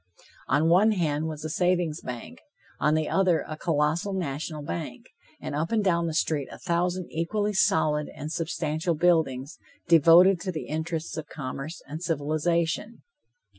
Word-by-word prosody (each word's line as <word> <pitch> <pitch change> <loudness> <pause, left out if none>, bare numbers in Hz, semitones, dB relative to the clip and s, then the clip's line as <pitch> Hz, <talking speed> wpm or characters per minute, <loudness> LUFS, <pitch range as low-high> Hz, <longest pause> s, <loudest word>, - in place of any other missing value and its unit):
On 155 +2 +2
one 195 +6 +5
hand 160 -4 0
was 155 -1 -6
a - - -3
savings 175 -2 0
bank, 120 -9 -7 0.4
on 150 +2 +3
the 155 -1 0
other 185 -4 +2
a 155 - -5
colossal 160 +4 0
national 155 -3 -4
bank, 85 -11 -5 0.3
and - - -6
up 155 +3 -2
and 220 -2 +2
down 170 -3 +2
the 160 - -3
street 150 -4 0
a - - -9
thousand 180 +1 -1
equally 205 +6 -1
solid 150 -5 +2
and 150 +2 -6
substantial 165 0 -1
buildings, 155 -5 +1 0.3
devoted 170 +3 +7
to 190 - -2
the 160 - -5
interests 160 +2 -4
of 155 -2 -5
commerce 140 +3 -6
and 155 +3 -6
civilization. 165 +5 -1
160 Hz, 155 wpm, -26 LUFS, 150-175 Hz, 0.4 s, devoted